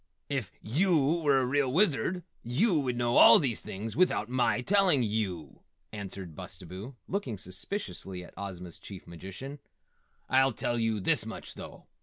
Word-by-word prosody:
"If 135 Hz, -8 st, -2 dB
yew 160 Hz, -, +2 dB
were 145 Hz, -3 st, +4 dB
a 130 Hz, -, +2 dB
real 135 Hz, 0 st, +1 dB
Wizard 175 Hz, -, +2 dB, 0.2 s
yew 160 Hz, -, +2 dB
would 130 Hz, -3 st, -1 dB
know 120 Hz, 0 st, +2 dB
all 115 Hz, -, +10 dB
these 130 Hz, -8 st, -1 dB
things 105 Hz, +3 st, -6 dB
without 170 Hz, -11 st, +2 dB
my 125 Hz, -1 st, +1 dB
telling 185 Hz, -4 st, +4 dB
yew," 95 Hz, -, -3 dB, 0.3 s
answered 95 Hz, -5 st, -7 dB
Bustabo, 100 Hz, -, -8 dB
looking 175 Hz, -, -3 dB
suspiciously 95 Hz, -, -4 dB
at -, -, -14 dB
Ozma's 90 Hz, -3 st, -7 dB
Chief 95 Hz, -3 st, -10 dB
Magician. 95 Hz, -, -8 dB, 0.7 s
"I'll 135 Hz, 0 st, +4 dB
tell 120 Hz, 0 st, -1 dB
you 115 Hz, -2 st, +1 dB
this -, -, +1 dB
much, -, -, -7 dB
though. -, -, -10 dB
120 Hz, 150 wpm, -30 LUFS, 100-145 Hz, 0.7 s, all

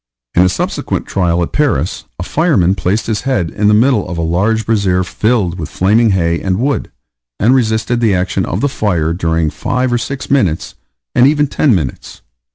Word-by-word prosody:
In 90 Hz, -, +4 dB
a 90 Hz, -, +4 dB
subsequent -, -, -3 dB
trial, 85 Hz, -2 st, 0 dB
at -, -, -5 dB
Paris, 115 Hz, -, -1 dB
a 90 Hz, -, -4 dB
fireman 125 Hz, -, +2 dB
placed 100 Hz, +2 st, -1 dB
his 110 Hz, -2 st, -2 dB
head 105 Hz, -, -1 dB
in 105 Hz, -, 0 dB
the 105 Hz, -, +5 dB
middle 115 Hz, -2 st, +2 dB
of 85 Hz, -, -5 dB
a 85 Hz, -, -1 dB
large 100 Hz, +7 st, 0 dB
brazier 100 Hz, -5 st, +1 dB
filled 100 Hz, -3 st, -1 dB
with 80 Hz, -, -5 dB
flaming 110 Hz, +5 st, +2 dB
hay 85 Hz, -4 st, 0 dB
and 95 Hz, -1 st, -1 dB
wood, 135 Hz, +5 st, -1 dB, 0.5 s
and 115 Hz, +5 st, +3 dB
resisted 115 Hz, -1 st, +1 dB
the 110 Hz, -5 st, +2 dB
action 90 Hz, +1 st, -1 dB
of 90 Hz, +5 st, -3 dB
the 145 Hz, -, +2 dB
fire 85 Hz, -, -1 dB
during 80 Hz, -2 st, 0 dB
five 125 Hz, 0 st, -1 dB
or 120 Hz, -, +1 dB
six 135 Hz, +3 st, -5 dB
minutes 95 Hz, -, 0 dB, 0.4 s
and 125 Hz, -, +5 dB
even 145 Hz, 0 st, +2 dB
ten 140 Hz, -3 st, +2 dB
minutes. 75 Hz, -8 st, -5 dB
100 Hz, 190 wpm, -15 LUFS, 90-120 Hz, 0.5 s, the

